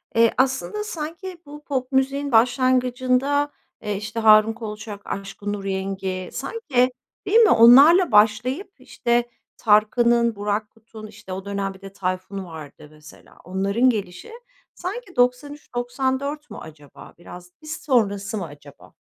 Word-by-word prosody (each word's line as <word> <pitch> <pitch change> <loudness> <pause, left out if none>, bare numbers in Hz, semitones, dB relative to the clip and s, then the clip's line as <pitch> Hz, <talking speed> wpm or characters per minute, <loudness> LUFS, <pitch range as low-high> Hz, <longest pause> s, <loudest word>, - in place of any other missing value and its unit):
Eee, 230 0 +5
aslında 270 +11 0
sanki 350 -1 -7
bu 295 +1 -12
pop 260 -2 -3
müziğin 275 +1 0
başlangıcında, 255 +3 +2 0.3
eee, 210 -1 -3
işte, 215 +3 -5
Harun 215 0 +6
Kolçak, 215 -2 -8
Aşkın 200 +1 -5
Nur 205 -1 -6
Yengi 190 -1 -4
sanki 270 - -1 0.3
Değil 405 +3 +3
mi? 445 -3 +6
Onlarla 275 +9 +7
başlayıp, 220 - +2
işte, 240 0 -1 0.3
Tarkan'ın, 230 +2 +3
Burak 205 +1 -2
Kut'un, 220 -1 -13
işte, 190 -2 -10
o 190 +1 -7
dönem 200 -1 -3
bir 190 - -17
de 195 0 -11
Tayfun 185 0 -4
vardı 155 -3 -11
mesela 150 0 -17
onların 200 +7 +1
gelişi 200 - -4 0.4
sanki 380 +1 -7
93-94 265 +2 -2
mü - - -9
acaba 150 -2 -13
biraz, 175 +1 -12
biz 310 +1 -6
sonrası 210 -5 0
mı 190 - -4
acaba? 145 -2 -15
230 Hz, 130 wpm, -22 LUFS, 200-270 Hz, 0.4 s, Onlarla